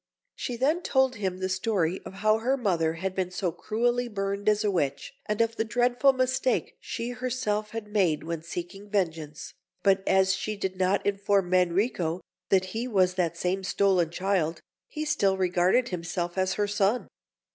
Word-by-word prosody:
She 245 - -4
then 300 +8 +2
told 265 -5 +2
him 190 -3 -2
the 185 0 -2
story 190 -2 0
of 190 - -10
how 215 +1 +5
her 260 +4 +1
mother 170 -9 +1
had 185 +3 -3
been 185 -1 -1
so 180 -1 -2
cruelly 240 +6 0
burned 200 -1 -1
as 210 0 +2
a 210 - +2
witch, 145 - -2
and 210 +1 0
of 230 0 0
the - - +2
dreadful 245 +4 +3
mistake 260 -1 0
she 230 +1 -4
herself 245 -4 -2
had 225 -1 -6
made 180 -7 +2
when 165 0 -4
seeking 175 +4 -7
vengeance; 160 -7 -2 0.3
but 195 -1 +4
as 190 0 +4
she 210 +2 -3
did 190 -1 -3
not 185 +2 +1
inform 200 -2 +1
Manrico 180 -1 +1 0.3
that 185 -1 +4
he 230 +3 -2
was 185 -6 +3
that 170 -2 -1
same 185 +2 -1
stolen 185 -3 +2
child, 175 -2 0 0.3
he 305 0 -4
still 200 -11 +2
regarded 185 +6 +2
himself 175 0 -3
as 185 -1 +1
her 205 +1 0
son. 205 +3 +1
195 Hz, 175 wpm, -27 LUFS, 180-225 Hz, 0.3 s, how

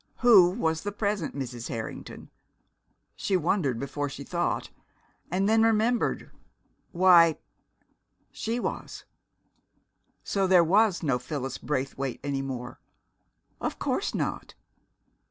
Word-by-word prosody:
Who 210 -8 +7
was 160 -5 -1
the 205 - -4
present 200 -6 -2
Mrs. 125 -4 -5
Harrington? 110 -1 -7 0.8
she 190 - 0
wondered 155 - 0
before 145 +2 -3
she 140 - -8
thought 175 +3 -2 0.6
and 190 +3 0
then 220 +1 +4
remembered. 225 +1 +1 0.6
Why 170 -3 +6 0.9
she 230 +2 -3
was! - - -5 1.2
So 195 -1 0
there 180 -2 +6
was 195 +2 +3
no 135 -5 +1
Phyllis 135 -1 -5
Braithwaite 135 -2 -3
any 140 -1 -2
more! 125 -3 -6 0.8
Of - - -3
course - - -2
not.... - - -3
170 Hz, 110 wpm, -27 LUFS, 135-200 Hz, 1.2 s, Who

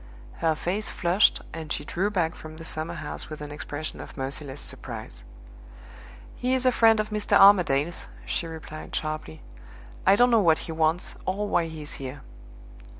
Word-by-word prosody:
Her 160 -1 +2
face 190 +7 -1
flushed 180 +3 +3
and 160 -1 -6
she - - -2
drew 190 +4 0
back 175 -5 0
from 155 0 -10
the 165 - -8
summerhouse 165 +2 -4
with 155 - -7
an 150 0 -7
expression 150 +1 -5
of - - -11
merciless 135 +1 -4
surprise. - - -6 1.1
"He 255 +1 +1
is 260 0 -1
a 255 - +6
friend 225 -2 +5
of 215 0 -1
Mr. 210 -1 +3
Armadale's," 175 -6 +5 0.2
she 170 - -2
replied 160 -1 -8
sharply. 155 - -4 0.6
"I 195 - +6
don't 245 +3 +5
know 230 -2 +6
what 165 -4 +5
he - - -5
wants, 160 +2 0
or 200 +3 0
why 170 -4 +2
he 160 -1 -7
is 145 - -4
here." 135 +1 -6
165 Hz, 170 wpm, -26 LUFS, 155-200 Hz, 1.1 s, a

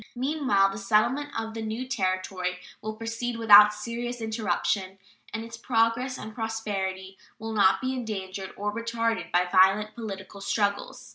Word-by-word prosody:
Meanwhile 260 -7 +2
the 195 - -6
settlement 230 +8 +1
of 225 0 -5
the 225 - -5
new 220 +4 -4
Territory 185 -5 -2 0.2
will 215 0 -5
proceed 230 +2 -4
without 210 -2 +8
serious 235 +3 -5
interruption, 205 -3 -1 0.3
and 225 - -4
its 230 0 -9
progress 230 +2 +1
and 215 +1 -8
prosperity 195 -4 -4 0.2
will 225 0 -5
not 195 -3 +4
be 260 0 -1
endangered 195 -6 -5
or 205 +1 -2
retarded 230 -5 -2
by 180 +1 +3
violent 195 +3 +4
political 200 -3 -7
struggles. 200 0 -2
215 Hz, 145 wpm, -27 LUFS, 195-230 Hz, 0.3 s, without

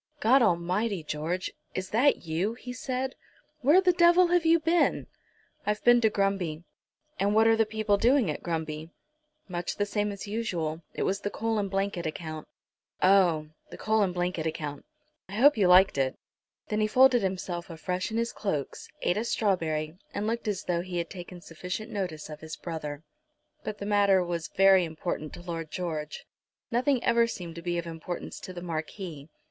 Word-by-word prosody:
"God 255 +5 +5
Almighty, 185 0 +1
George; 155 +5 -3 0.2
is 185 0 -4
that 255 +6 +3
you?" 175 +8 -1
he 250 0 -8
said. 255 +1 -3 0.5
"Where 295 +8 +6
the 370 -1 +4
devil 345 +1 +5
have 350 -2 +3
you 335 +1 +6
been?" 330 +2 +2 0.6
"I've 210 0 -1
been 240 0 +6
to 220 - +4
Grumby." 195 -6 -1 0.6
"And 200 +2 +2
what 220 +1 +5
are 225 0 +6
the 225 -1 +2
people 215 -1 +1
doing 245 +2 +3
at - - -6
Grumby?" 160 -2 -4 0.6
"Much 175 -2 -3
the 205 - 0
same 205 0 -1
as 200 +1 -7
usual. 175 -8 -2
It - - -1
was 195 +1 0
the 205 - -3
coal 225 +1 -1
and 200 -1 -1
blanket 195 -3 -1
account." 155 0 -6 0.6
"Oh! 180 -5 +4 0.2
the - - -9
coal 220 +1 +1
and 195 -3 +2
blanket 175 -2 -1
account! 150 - -5 0.4
I - - -9
hope 275 +8 +6
you 200 -5 +3
liked 180 -4 +6
it." 130 -1 0 0.5
Then 215 0 0
he 215 - +3
folded 250 +2 +5
himself 185 -2 -3
afresh 180 +3 -3
in 220 - -3
his 235 0 -1
cloaks, 155 -10 -3 0.2
ate 175 - +2
a 215 - 0
strawberry, 165 -8 -1 0.2
and 205 - -1
looked 230 +1 -2
as 205 -1 -1
though 175 -1 0
he 180 0 -5
had 170 -1 -3
taken 175 -1 -9
sufficient 180 +7 -6
notice 180 -7 -4
of 150 -1 -9
his 160 0 -7
brother. 155 -3 -6 0.6
But 215 -1 -4
the 200 - -6
matter 200 -2 +4
was 170 -2 -3
very 195 -1 +5
important 160 -1 -4
to 175 - -10
Lord 165 -3 -5
George. 155 -4 -4 0.5
Nothing 250 +2 +2
ever 235 0 +4
seemed 175 -7 -6
to 170 - -8
be 175 0 -2
of 170 - -3
importance 165 +1 -6
to - - -8
the 175 -1 -8
Marquis. 160 -2 -5
190 Hz, 185 wpm, -28 LUFS, 165-220 Hz, 0.6 s, Where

